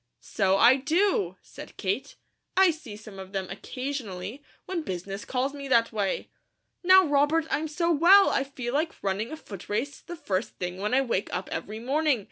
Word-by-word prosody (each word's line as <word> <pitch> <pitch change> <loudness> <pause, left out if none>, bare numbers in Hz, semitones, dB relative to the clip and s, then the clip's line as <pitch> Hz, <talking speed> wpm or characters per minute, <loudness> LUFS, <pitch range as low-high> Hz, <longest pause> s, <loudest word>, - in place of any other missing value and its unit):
"So 195 -2 +1
I 240 +6 +7
do!" 380 - +1
said - - -12
Kate. - - -2 0.4
"I 380 -2 +6
see 290 -10 -9
some 210 -2 -11
of 190 +1 -10
them 190 -1 -2
occasionally, 230 -1 -5 0.2
when 365 -3 -3
business 195 - -5
calls 265 +2 -1
me 280 -1 -7
that 230 -3 +3
way. 205 -3 -2 0.5
Now, 375 +1 +7
Robert, 295 +2 +2
I'm 315 +2 0
so 335 +3 0
well, 355 +6 +7
I 270 - +1
feel 255 -3 -5
like 315 +3 0
running 200 +3 -1
a 315 - -5
footrace 220 - -5
the 345 - -8
first 200 - -3
thing 180 0 -4
when 210 +5 0
I 270 - +5
wake 235 -7 -1
up 185 +1 -4
every 215 +1 -4
morning. 280 +2 +1
260 Hz, 180 wpm, -27 LUFS, 200-310 Hz, 0.5 s, I